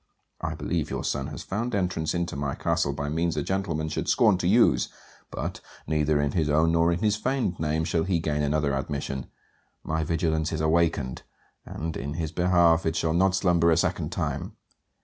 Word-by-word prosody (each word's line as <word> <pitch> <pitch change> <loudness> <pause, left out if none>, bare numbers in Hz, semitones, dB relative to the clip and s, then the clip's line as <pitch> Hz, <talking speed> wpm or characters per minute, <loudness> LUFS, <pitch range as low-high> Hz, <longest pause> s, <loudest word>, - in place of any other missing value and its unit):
I - - -2
believe - - -2
your - - -3
son 70 0 -1
has 75 -1 -7
found 115 +4 -2
entrance 90 -4 -1
into 85 -2 -2
my 70 -1 -2
castle 70 - 0
by 70 +1 -4
means 80 +2 -1
a 75 - 0
gentleman 85 -4 -1
should - - -3
scorn 105 -6 +4
to 90 - 0
use; 115 +5 +4 0.4
but, - - -5 0.2
neither 75 0 +1
in 75 -1 +1
his 80 -2 0
own 80 +2 +3
nor 85 +1 +3
in 85 - -1
his 105 -1 +3
feigned 125 -5 -1
name, 80 0 0
shall 80 0 0
he 95 -2 +1
gain 75 -2 -1
another 75 -1 +1
admission. 70 -1 -3 0.6
My 80 0 -1
vigilance 80 -1 0
is 80 - -2
awakened; 80 -5 +1 0.5
and, 80 +1 -5
in 70 +2 -4
his 80 -1 -3
behalf, 85 -2 +3
it 80 0 -1
shall 80 -1 0
not 95 +2 +3
slumber 85 -3 +3
a 80 - +4
second - - 0
time. - - -3
80 Hz, 190 wpm, -26 LUFS, 75-90 Hz, 0.6 s, scorn